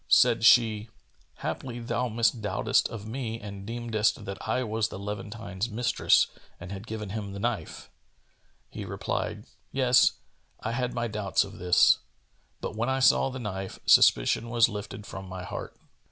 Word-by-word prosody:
Said - - +5
she, 115 -2 +5 0.5
"Haply 120 -2 -4
thou 120 +1 -2
misdoubtedst 110 -3 +1
of 110 -3 -7
me 115 -1 -4
and 100 -2 -8
deemedst 115 -2 -1
that 100 +2 -7
I 125 +3 +1
was 110 -1 0
the - - -7
Levantine's 105 +1 -5
mistress 115 +2 +3 0.3
and 90 +2 -8
had 100 +3 -7
given 105 -3 -5
him 100 -2 -5
the 100 - -6
knife." 115 +1 -4 0.8
He - - -6
replied, - - -3 0.3
"Yes, 130 -2 +4 0.5
I 110 - -3
had 125 +1 -2
my 120 0 -1
doubts 105 -3 0
of 100 +1 -10
this; 90 -1 +5 0.6
but, - - -4
when 115 +3 -1
I 130 - +1
saw 135 0 +4
the 130 - -6
knife, 95 -5 -5
suspicion 85 - +5
was 120 -1 +4
lifted 105 -1 -7
from 95 -2 -8
my 90 -1 -6
heart." - - -7
110 Hz, 155 wpm, -28 LUFS, 100-120 Hz, 0.8 s, Said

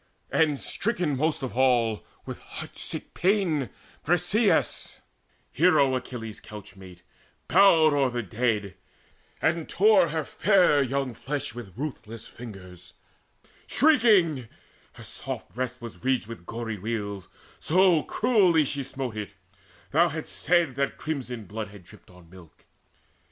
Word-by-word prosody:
And 150 -4 +2
stricken 180 -9 -1
most 150 +1 0
of 130 - -4
all 120 -4 +2 0.2
with - - -7
heart - - -9
sick - - -5
pain 175 - +1 0.3
Briseis, 180 +6 +1 0.5
hero 140 -4 +4
Achilles' 115 -4 -6
couchmate, 95 -4 -12 0.4
bowed 160 -6 +6
Over 130 -4 +1
the - - -15
dead, 105 -3 -1 0.7
and 160 0 0
tore 200 -3 +5
her 155 -1 -2
fair 180 -7 +3
young 135 -1 -1
flesh 145 +5 -4
With 115 -5 -10
ruthless 120 -6 -6
fingers, 95 -6 -11 0.7
shrieking: 210 - +4 0.5
her - - -12
soft - - -6
breast 130 +1 -4
Was 115 0 -9
ridged 130 -4 +1
with 110 -6 -10
gory 115 -2 -5
weals, 100 -3 -4 0.3
so 180 -1 +4
cruelly 190 -10 +3
She 140 +1 -3
smote 130 -3 -5
it 105 -1 -6 0.6
thou 170 +3 +4
hadst 160 +1 -5
said 175 -5 +2
that 140 0 -1
crimson 125 -7 -5
blood 105 +3 -5
Had 100 -2 -14
dripped 85 - -17
on 90 -2 -17
milk. 85 -2 -17
130 Hz, 130 wpm, -26 LUFS, 110-165 Hz, 0.7 s, bowed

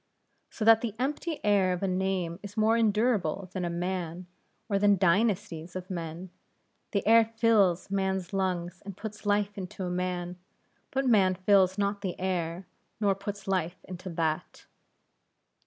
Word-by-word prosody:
So 215 - -4
that 225 0 +7
the 225 -3 -3
empty 295 +5 -2
air 200 -3 +4
of 180 - -4
a - - +2
name 185 -2 -1
is 205 +1 -10
more 220 +1 +4
endurable 210 -5 +1
than 185 - -3
a 175 - -1
man, 175 0 -3 0.4
or 200 -3 +1
than 205 0 +4
dynasties 185 -2 +1
of 185 +1 -6
men; 170 +1 -5 0.6
the 200 - -1
air 230 +1 +7
fills 220 -5 +2
man's 190 -1 -1
lungs 180 -2 -2
and 200 -2 -8
puts 215 -1 -7
life 205 0 +1
into 190 +1 -6
a 180 - -2
man, 180 0 -3 0.5
but 270 0 -1
man 195 -6 +4
fills 190 0 +3
not 200 0 0
the 190 -3 -4
air, 180 -1 -2 0.3
nor 205 -2 +3
puts 200 0 -7
life 185 -2 -1
into 185 0 -8
that. 160 -2 -2
190 Hz, 155 wpm, -29 LUFS, 180-205 Hz, 0.6 s, that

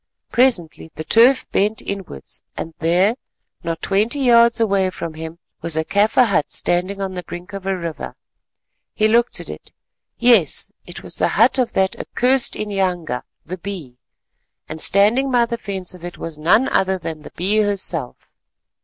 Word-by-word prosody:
Presently 230 -11 +1
the 155 - -5
turf 240 - +4
bent 210 +3 +1
inwards 195 - -6 0.2
and 165 - -5
there, 180 +6 +3 0.5
not 165 -1 -4
twenty 215 +8 +1
yards 235 -3 +5
away 200 -4 +2
from 170 -3 -6
him, 160 +1 -8 0.2
was 165 -2 -2
a 160 - 0
Kaffir 210 +7 +3
hut 185 -9 0
standing 185 +3 -1
on 195 -1 -3
the 180 - -4
brink 175 +3 -9
of 195 -1 -6
a 190 -1 0
river. 170 -3 -6 0.8
He 215 - +3
looked 235 +2 +2
at - - -8
it, - - -10 0.5
yes, 235 - +3 0.2
it - - -9
was - - -6
the - - +2
hut 235 +5 +4
of 250 - 0
that 190 0 +1
accursed 255 +1 +2
inyanga, 180 -10 -2 0.2
the 185 +1 -6
Bee, 165 -10 -7 0.7
and 155 +1 -7
standing 220 +8 +3
by 245 -2 +3
the 235 0 -5
fence 190 -5 -3
of 180 -2 -14
it 175 0 -7
was 160 -2 -7
none 185 +11 +3
other 190 0 +1
than 160 -3 -6
the - - -12
Bee 195 +5 +2
herself. 190 -10 -2
195 Hz, 170 wpm, -20 LUFS, 170-225 Hz, 0.8 s, yards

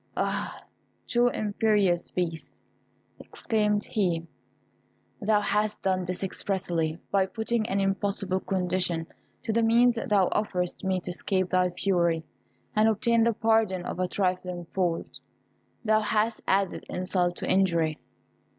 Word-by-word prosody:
Ah! - - -2 0.4
too 240 0 +3
imperious 205 -5 +1
Beast," 165 -3 -4 0.6
exclaimed 210 -2 0
he, 175 -6 -1 1.0
"thou 210 0 +3
hast 210 +1 -1
done 185 -1 +1
this 180 +2 -3
expressly! 175 -5 -1
By 195 -1 +3
putting 225 +1 -1
an 195 - 0
impossible 195 -1 0
condition 180 -3 -1 0.4
to 225 - -1
the 230 - +3
means 235 +1 +4
thou 195 -3 +4
offerest 180 -4 -1
me 190 -1 0
to 180 - -4
escape 185 0 -1
thy 180 -1 +3
fury, 175 -3 +1 0.5
and 215 +1 +5
obtain 230 +2 +2
the 230 0 +3
pardon 220 -5 +1
of - - -5
a 185 - +1
trifling 180 -2 -2
fault, 175 -3 -2 0.7
thou 215 0 +4
hast 215 +1 0
added 195 -1 +1
insult 180 -1 0
to - - -5
injury! 170 -5 +2
195 Hz, 130 wpm, -27 LUFS, 180-215 Hz, 1.0 s, and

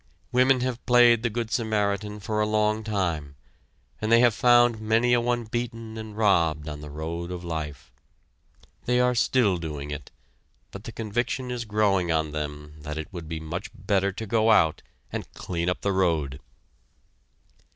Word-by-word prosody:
Women 125 +1 +4
have 125 -1 -2
played 120 -2 +6
the 120 - 0
good 115 0 -3
Samaritan 105 -4 -1
for 105 +1 -2
a 105 - +2
long 105 0 +1
time, 85 -10 -2 0.7
and 110 +1 -1
they 115 - +7
have 120 -2 +5
found 120 -1 +4
many 115 +3 +2
a 120 - +4
one 120 0 0
beaten 115 -1 -5
and 110 -1 -8
robbed 85 -8 +2
on 75 -1 -6
the 75 - -8
road 80 +3 -5
of 90 -1 -6
life. 75 -7 -5 0.9
They 125 0 +2
are 125 0 +3
still 115 -5 +2
doing 75 -3 -5
it, 75 -1 -6 0.6
but 100 +1 -10
the - - -6
conviction 120 +3 -2
is 120 -1 -3
growing 100 -5 +1
on 80 -1 0
them 75 0 -6
that 75 0 -6
it 80 +4 -6
would 85 -3 -7
be 80 -1 -3
much 80 +1 -5
better 100 -1 0
to 110 +4 -6
go 110 +1 +2
out 80 -8 +4 0.3
and - - -5
clean 85 -1 -2
up 90 - -2
the 100 - 0
road! 80 -8 0
105 Hz, 170 wpm, -26 LUFS, 80-115 Hz, 0.9 s, they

